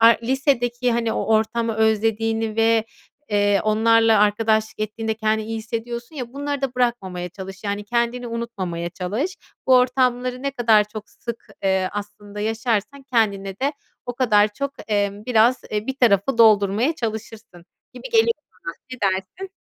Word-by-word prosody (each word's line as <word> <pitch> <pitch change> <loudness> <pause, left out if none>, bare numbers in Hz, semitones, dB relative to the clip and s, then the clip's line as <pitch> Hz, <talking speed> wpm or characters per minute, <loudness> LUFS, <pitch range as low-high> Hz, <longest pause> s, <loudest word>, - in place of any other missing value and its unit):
a 225 - +7 0.2
lisedeki 250 -1 +1
hani 230 -1 0
o - - -2
ortamı 225 +1 0
özlediğini 220 0 +1
ve, 225 0 +3 0.5
ııı, 205 -1 +3
onlarla 225 +1 +4
arkadaşlık 215 +1 +1
ettiğinde 220 +1 -2
kendini 220 -1 0
iyi 225 0 -3
hissediyorsun 235 +5 -5
ya, 245 -3 -6
bunları 285 0 -3
da 265 -2 -2
bırakmamaya 195 -8 -1
çalış. 190 +2 -10
Yani 205 0 -2
kendini 235 +2 -1
unutmamaya 195 -8 -4
çalış. 210 - -3 0.3
Bu 260 - +6
ortamları 250 0 +1
ne 275 - -1
kadar 225 -5 +4
çok 210 0 -9
sık, 235 -1 -8 0.2
ııı, 190 -1 +2
aslında 205 0 -7
yaşarsan 225 +4 -1
kendine 200 -4 0
de 275 +2 0 0.3
o 245 - -4
kadar 215 -4 +4
çok, 280 +5 -3 0.2
emm, 205 0 -1
biraz, 245 +1 +3
e, 210 +1 -2
bir 265 - -3
tarafı 230 -1 +2
doldurmaya 215 +5 +4
çalışırsın 220 - -6 0.3
gibi - - -9
geliyor 460 0 +4 0.3
bana. 165 - -4 0.2
Ne 255 - -8
dersin? 190 - -5
225 Hz, 150 wpm, -22 LUFS, 205-245 Hz, 0.5 s, a